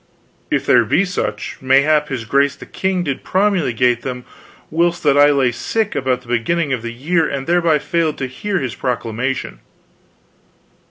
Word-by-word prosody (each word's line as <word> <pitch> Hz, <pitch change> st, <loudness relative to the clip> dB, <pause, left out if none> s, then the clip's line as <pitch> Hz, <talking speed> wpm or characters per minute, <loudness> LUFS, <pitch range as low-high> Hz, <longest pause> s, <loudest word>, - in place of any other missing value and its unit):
"If -, -, 0 dB
there 120 Hz, -, +5 dB
be 160 Hz, -, +2 dB
such, 105 Hz, -, -4 dB
mayhap 140 Hz, +3 st, +3 dB
his 130 Hz, -4 st, -4 dB
grace 140 Hz, +4 st, +2 dB
the -, -, -11 dB
king 190 Hz, -1 st, -1 dB
did 140 Hz, -5 st, -3 dB
promulgate 130 Hz, -, +1 dB
them 125 Hz, -1 st, -6 dB, 0.5 s
whilst 170 Hz, +2 st, +1 dB
that 145 Hz, -2 st, +4 dB
I 145 Hz, 0 st, +6 dB
lay 135 Hz, -4 st, +2 dB
sick 220 Hz, -, -2 dB
about 130 Hz, -2 st, -1 dB
the -, -, -20 dB
beginning 140 Hz, +6 st, 0 dB
of 125 Hz, -, -2 dB
the 115 Hz, 0 st, -5 dB
year 160 Hz, +8 st, 0 dB
and 135 Hz, -1 st, -4 dB
thereby 170 Hz, -2 st, +3 dB
failed 160 Hz, +1 st, -1 dB
to 130 Hz, -, -3 dB
hear 195 Hz, +11 st, -3 dB
his 130 Hz, -8 st, -3 dB
proclamation." 125 Hz, +2 st, -3 dB
140 Hz, 165 wpm, -18 LUFS, 125-170 Hz, 0.5 s, I